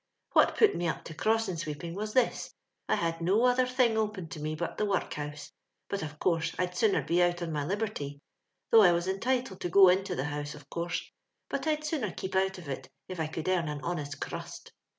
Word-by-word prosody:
" - - -40
What - - +5
put 435 - +5
me 175 0 -1
up - - -2
to 160 - -8
crossing 215 +1 +1
sweeping 160 +1 -5
was 215 +3 -4
this 255 -2 +1
— - - -40
I - - +4
had 165 0 -1
no 200 +8 +3
other 250 0 +4
thing 250 -3 +2
open 210 -6 -2
to 155 - -7
me 155 +1 -2
but 170 +2 -4
the 210 - +2
workhouse; 150 -7 -3 0.4
hut 200 - -1
of 150 -1 -6
course 165 0 +1
I'd 180 0 -1
sooner 210 +2 +3
be 175 +1 +2
out 175 0 +2
on 165 - -3
my 150 -2 -1
liberty, 180 -6 -3 0.5
though 225 - +9
I 180 -4 +7
was 170 +1 0
entitled 235 +1 -1
to 175 - -1
go 190 +1 +8
into 190 0 +1
the 135 - -1
housf», 145 0 -4
of 145 -1 -14
course, 170 +1 -3 0.4
but - - -2
I'd 305 0 0
sooner 295 - -1
keep 190 +2 -5
out 190 +1 +2
of 175 -4 -10
it 135 - -5 0.2
if 185 -2 -6
I 160 - 0
could 160 +1 -5
earn 180 -3 +2
an 150 -1 -4
honest 150 -4 -3
currust. - - -6
180 Hz, 230 wpm, -30 LUFS, 160-210 Hz, 0.5 s, though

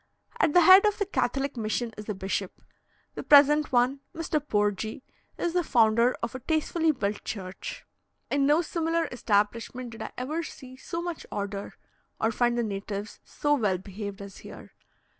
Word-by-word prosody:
At 305 - +3
the 355 - +7
head 375 +3 +9
of 420 - 0
the 405 - 0
Catholic 270 -4 -1
mission 230 +1 -2
is 210 +1 -9
a 210 - -2
bishop. 190 0 -3 0.5
The - - -5
present 295 +1 +6
one, 255 +2 +2 0.2
Mr. 325 -1 -1
Porgi, 215 -3 -1 0.3
is 345 - -1
the 355 -1 +2
founder 235 -1 +3
of 235 - -2
a 260 - -5
tastefully 320 +3 +1
built 210 -7 -3
church. 190 -3 -6 0.5
In 280 -1 +2
no 305 +4 +4
similar 330 0 0
establishment 230 +2 -1
did 225 0 -10
I 220 - -4
ever 300 +7 -2
see 260 -5 -10
so 335 +6 -5
much 345 -2 -5
order, 200 0 -4 0.4
or 225 - +1
find 240 +1 +1
the 240 - +1
natives 200 0 -5
so 290 0 -1
well 210 -9 +1
behaved 200 +1 -7
as 200 -1 -11
here. - - -12
245 Hz, 170 wpm, -27 LUFS, 210-300 Hz, 0.5 s, head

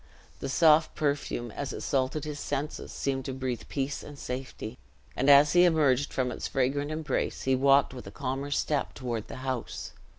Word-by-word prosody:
The 135 - -4
soft 155 +2 +5
perfume, 140 -5 -1
as 140 +5 -4
it - - -6
saluted 135 +1 0
his 150 -1 -5
senses, 145 +1 -3
seemed 135 -1 -2
to 135 - -3
breathe 130 -2 -3
peace 140 0 -2
and 145 -1 -10
safety; 125 -3 -6 0.4
and 135 +3 +2
as 145 +1 +7
he 175 0 +7
emerged 145 -5 +3
from 125 -1 0
its - - -4
fragrant 135 +2 0
embrace, 155 -3 -2
he 130 0 +3
walked 140 +1 +4
with 125 - -9
a - - -8
calmer 135 0 -3
step 145 0 0
toward 120 -5 -4
the - - -8
house. 130 -3 -4
135 Hz, 185 wpm, -29 LUFS, 130-145 Hz, 0.4 s, as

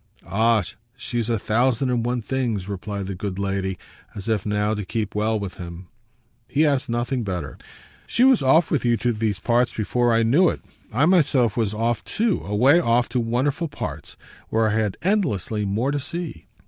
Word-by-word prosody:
"Ah 110 0 +2 0.3
she's 120 -1 -3
a 115 - +1
thousand 125 +4 +1
and 120 -2 0
one 120 0 -1
things!" 115 -7 -2
replied 100 0 -4
the 95 - -4
good 95 +1 -5
lady, 95 -1 -2 0.4
as 100 0 -7
if 110 -3 0
now 105 +1 +1
to 105 -1 -3
keep 110 0 -3
well 110 +1 0
with 100 -3 -5
him. 85 +1 -9 0.6
He 155 +3 +2
asked 140 -4 +1
nothing 120 +2 -1
better. 90 -7 -4 0.5
"She 240 - +2
was 260 -2 +5
off 145 +5 +4
with 150 - +1
you 120 -1 +2
to 120 +1 0
these 105 -2 -1
parts 120 +1 +1
before 120 +2 +1
I 115 0 +3
knew 155 +11 +4
it. - - -5 0.3
I 130 +7 +3
myself 145 - +3
was 110 -3 0
off 115 +1 0
too 220 -3 0
away 125 - +4
off 120 -6 +2
to 125 +1 0
wonderful 130 +7 0
parts, 140 - -7 0.3
where 110 0 +2
I - - 0
had 110 -3 0
endlessly 125 - 0
more 110 +8 0
to 145 - -1
see." 160 - -6
115 Hz, 185 wpm, -23 LUFS, 105-130 Hz, 0.6 s, was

